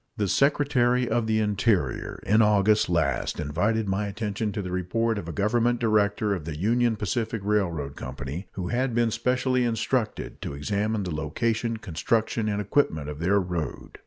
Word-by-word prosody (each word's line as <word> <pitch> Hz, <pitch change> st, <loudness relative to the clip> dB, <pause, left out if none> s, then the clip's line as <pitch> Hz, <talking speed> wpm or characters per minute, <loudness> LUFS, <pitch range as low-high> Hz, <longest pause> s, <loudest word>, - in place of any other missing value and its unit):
The 105 Hz, -2 st, 0 dB
Secretary 125 Hz, -1 st, +2 dB
of 115 Hz, 0 st, 0 dB
the 110 Hz, 0 st, +2 dB
Interior 100 Hz, -, 0 dB
in 110 Hz, +2 st, +4 dB
August 105 Hz, -1 st, +3 dB
last 80 Hz, -6 st, 0 dB
invited 105 Hz, +9 st, 0 dB
my 100 Hz, +2 st, 0 dB
attention 105 Hz, +1 st, -3 dB
to 105 Hz, -, -3 dB
the 90 Hz, -, -5 dB
report 105 Hz, +5 st, 0 dB
of 85 Hz, -, -8 dB
a -, -, -3 dB
Government 115 Hz, +5 st, +1 dB
director 105 Hz, -2 st, +2 dB
of 90 Hz, -6 st, -4 dB
the 80 Hz, -2 st, -5 dB
Union 115 Hz, +5 st, +2 dB
Pacific 110 Hz, +3 st, -2 dB
Railroad 85 Hz, -9 st, 0 dB
Company 65 Hz, +7 st, -6 dB
who 90 Hz, -2 st, -4 dB
had 125 Hz, 0 st, 0 dB
been 120 Hz, -1 st, +2 dB
specially 125 Hz, +2 st, +1 dB
instructed 115 Hz, 0 st, -1 dB
to -, -, -5 dB
examine 105 Hz, +8 st, -1 dB
the 90 Hz, -3 st, -4 dB
location, 115 Hz, +9 st, -1 dB
construction, 110 Hz, +4 st, -1 dB
and 105 Hz, 0 st, -1 dB
equipment 90 Hz, -, 0 dB
of 75 Hz, 0 st, -7 dB
their 95 Hz, +5 st, +3 dB
road. 90 Hz, -6 st, -4 dB
105 Hz, 165 wpm, -26 LUFS, 90-115 Hz, -, in